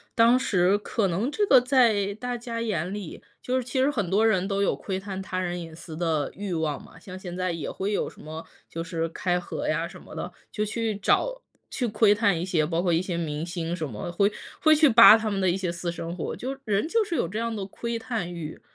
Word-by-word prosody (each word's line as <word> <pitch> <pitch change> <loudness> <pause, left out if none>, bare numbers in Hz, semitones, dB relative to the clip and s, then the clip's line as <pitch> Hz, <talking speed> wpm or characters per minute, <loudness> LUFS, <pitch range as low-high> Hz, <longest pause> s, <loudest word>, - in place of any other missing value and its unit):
当 235 +2 +5
时 190 -4 +3
可 205 0 -1
能 190 +8 -1
这 410 +8 +1
个 265 - +8
在 235 -6 +3
大 245 +3 -4
家 230 -1 -5
眼 190 -5 -2
里 205 -5 -7 0.2
就 255 +1 -1
是 255 - -1
其 250 +2 -5
实 275 +2 +3
很 210 -10 -2
多 205 +4 +3
人， 195 -4 +2
都 200 0 0
有 200 - +2
窥 190 -2 -4
探 190 0 -5
他 190 -1 -5
人 175 -1 -2
隐 165 -2 -8
私 160 -1 -9
的 160 -4 0
欲 200 -2 -4
望 160 -3 -1
嘛。 - - -15
像 185 -3 -10
现 180 -2 -7
在 185 0 -1
也 165 -3 -4
会 195 +2 -3
有 205 - 0
什 - - -16
么， 160 +1 -8 0.2
就 165 - -5
是 165 -1 -2
开 180 +2 0
盒 175 - -4
呀 165 +2 0
什 170 - -10
么 - - -12
的， 180 - -5 0.2
就 210 - -2
去 220 0 -2
找 - - +1 0.3
去 250 - -2
窥 210 -1 +4
探 200 -5 +2
一 175 - -2
些， 170 -5 +1
包 165 +2 0
括 175 -1 +1
一 165 - +3
些 185 -2 -3
明 155 -2 -3
星 170 -1 -3
什 165 -3 -3
么， 105 +7 -5
会 200 +3 +3 0.3
会 310 - +6
去 310 0 +6
扒 230 -2 +10
他 220 -1 -2
们 200 -2 -1
的 190 - +3
一 175 - +1
些 190 -2 -2
私 170 0 -3
生 170 0 -5
活， 175 - -4
就 265 +2 -4
人 205 +4 0
就 450 +6 +2
是 350 -4 -3
有 170 - +1
这 200 +6 -5
样 230 0 -1
的 205 -3 -4
窥 235 +4 -4
探 220 -7 -3
欲。 160 -3 -7
195 Hz, 270 characters per minute, -26 LUFS, 170-225 Hz, 0.3 s, 扒